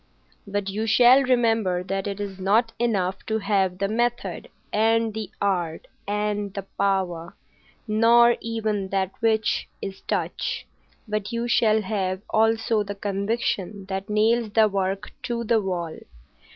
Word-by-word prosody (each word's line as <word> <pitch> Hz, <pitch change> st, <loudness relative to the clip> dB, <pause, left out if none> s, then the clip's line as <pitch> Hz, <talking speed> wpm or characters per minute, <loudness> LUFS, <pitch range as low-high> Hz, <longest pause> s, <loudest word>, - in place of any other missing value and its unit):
"But 200 Hz, 0 st, -2 dB
you 215 Hz, +3 st, -2 dB
shall 245 Hz, +4 st, +6 dB
remember 225 Hz, -8 st, +2 dB
that 195 Hz, +1 st, -3 dB
it 200 Hz, 0 st, -4 dB
is 195 Hz, -2 st, -5 dB
not 220 Hz, +5 st, +2 dB
enough 195 Hz, -5 st, 0 dB
to 220 Hz, -, 0 dB
have 195 Hz, -3 st, +1 dB
the 200 Hz, +1 st, 0 dB
method, 240 Hz, +3 st, -2 dB, 0.2 s
and 225 Hz, +1 st, +2 dB
the 220 Hz, -1 st, -5 dB
art, 175 Hz, -5 st, -1 dB, 0.2 s
and 205 Hz, 0 st, -1 dB
the 200 Hz, -, -3 dB
power, 180 Hz, -4 st, -1 dB, 0.5 s
nor 235 Hz, +2 st, +5 dB
even 215 Hz, -3 st, -2 dB
that 190 Hz, -1 st, -1 dB
which 220 Hz, -1 st, +1 dB
is 195 Hz, -1 st, -7 dB
touch, -, -, -2 dB, 0.4 s
but 210 Hz, -1 st, -2 dB
you 235 Hz, 0 st, -2 dB
shall 220 Hz, -2 st, +3 dB
have 190 Hz, -1 st, -2 dB
also 225 Hz, 0 st, +2 dB
the 200 Hz, 0 st, -4 dB
conviction 200 Hz, -1 st, -2 dB
that 195 Hz, +2 st, -4 dB
nails 220 Hz, +1 st, +2 dB
the 220 Hz, -1 st, +5 dB
work 195 Hz, 0 st, -2 dB
to 235 Hz, -1 st, -3 dB
the 225 Hz, -1 st, +2 dB
wall. 175 Hz, -4 st, -3 dB
210 Hz, 140 wpm, -24 LUFS, 195-225 Hz, 0.5 s, shall